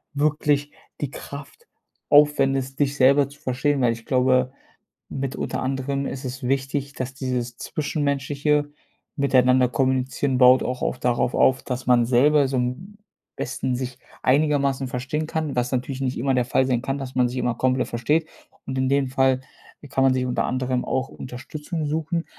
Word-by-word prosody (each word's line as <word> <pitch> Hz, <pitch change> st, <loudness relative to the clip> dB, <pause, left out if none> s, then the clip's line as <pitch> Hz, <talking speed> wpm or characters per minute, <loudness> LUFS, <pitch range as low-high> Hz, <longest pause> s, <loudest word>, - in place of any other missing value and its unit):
wirklich 145 Hz, 0 st, +1 dB, 0.3 s
die 140 Hz, -2 st, -2 dB
Kraft 145 Hz, -, -10 dB, 0.4 s
aufwendest, 135 Hz, -2 st, +3 dB
dich 140 Hz, 0 st, +1 dB
selber 140 Hz, +1 st, +5 dB
zu 145 Hz, -, -16 dB
verstehen, 135 Hz, +3 st, 0 dB
weil 120 Hz, -2 st, +3 dB
ich 115 Hz, 0 st, -11 dB
glaube, 130 Hz, 0 st, +2 dB, 0.6 s
mit 135 Hz, -1 st, -3 dB
unter -, -, -3 dB
anderem 135 Hz, +1 st, -2 dB
ist 135 Hz, +1 st, -5 dB
es 130 Hz, +1 st, -6 dB
wichtig, 135 Hz, +2 st, -1 dB
dass 130 Hz, 0 st, -4 dB
dieses 125 Hz, -3 st, -3 dB
zwischenmenschliche 145 Hz, 0 st, -1 dB, 0.5 s
miteinander 130 Hz, -2 st, +4 dB
kommunizieren, 130 Hz, +1 st, 0 dB
baut 125 Hz, 0 st, +7 dB
auch 125 Hz, 0 st, -3 dB
oft 125 Hz, -, -3 dB
darauf 120 Hz, 0 st, +1 dB
auf, 130 Hz, -1 st, +3 dB
dass 125 Hz, -1 st, -5 dB
man 120 Hz, -2 st, +4 dB
selber 140 Hz, +3 st, +4 dB
so 135 Hz, -, -2 dB
am 130 Hz, +12 st, -3 dB, 0.4 s
besten 125 Hz, 0 st, -2 dB
sich 125 Hz, 0 st, -5 dB, 0.2 s
einigermaßen 140 Hz, -1 st, +2 dB
verstehen 130 Hz, +5 st, -3 dB
kann, 155 Hz, -3 st, -3 dB
was 125 Hz, 0 st, 0 dB
natürlich 130 Hz, +1 st, -2 dB
nicht 130 Hz, -1 st, -1 dB
immer 135 Hz, +3 st, +1 dB
der 125 Hz, -1 st, +1 dB
Fall 130 Hz, +1 st, +2 dB
sein 125 Hz, -2 st, +1 dB
kann, 135 Hz, +1 st, -2 dB
dass 135 Hz, -2 st, -6 dB
man 125 Hz, -1 st, +3 dB
sich 125 Hz, -, -6 dB
immer 120 Hz, -1 st, 0 dB
komplett 130 Hz, +1 st, +1 dB
versteht 150 Hz, +8 st, 0 dB, 0.4 s
und 130 Hz, 0 st, -4 dB
in 130 Hz, 0 st, +1 dB
dem 140 Hz, 0 st, +2 dB
Fall 130 Hz, 0 st, +2 dB, 0.5 s
kann 135 Hz, -, +1 dB
man 130 Hz, -, +4 dB
sich 130 Hz, 0 st, 0 dB
unter 125 Hz, -, -1 dB
anderem 130 Hz, -1 st, -1 dB
auch 130 Hz, +1 st, -1 dB
Unterstützung 150 Hz, +6 st, -6 dB
suchen. 160 Hz, +2 st, -1 dB
130 Hz, 170 wpm, -23 LUFS, 125-140 Hz, 0.6 s, baut